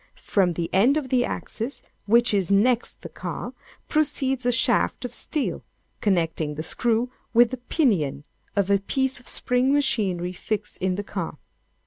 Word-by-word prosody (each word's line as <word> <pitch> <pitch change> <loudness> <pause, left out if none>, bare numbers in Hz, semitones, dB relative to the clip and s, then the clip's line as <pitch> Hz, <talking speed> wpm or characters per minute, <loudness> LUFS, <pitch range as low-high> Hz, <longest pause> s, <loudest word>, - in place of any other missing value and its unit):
From 185 -4 +1
the 170 0 -2
end 240 +10 +4
of 280 -4 -3
the 250 -1 +3
axis 235 +3 -5 0.2
which 235 +2 +4
is 195 -4 +1
next 230 +5 +2
the - - -5
car, - - -6 0.3
proceeds 270 -4 +1
a - - +4
shaft 235 +1 +2
of 245 - -5
steel, 300 +3 -1 0.4
connecting 165 -6 0
the 155 - -4
screw 235 +7 0 0.2
with 240 0 +6
the 255 - -3
pinion 185 - 0 0.3
of 200 -1 +1
a 200 - +4
piece 265 +5 -1
of 245 - -18
spring 250 +2 +1
machinery 200 -11 +1
fixed 210 +3 -4
in 185 0 0
the 205 - -3
car. - - -5
230 Hz, 160 wpm, -24 LUFS, 190-255 Hz, 0.4 s, with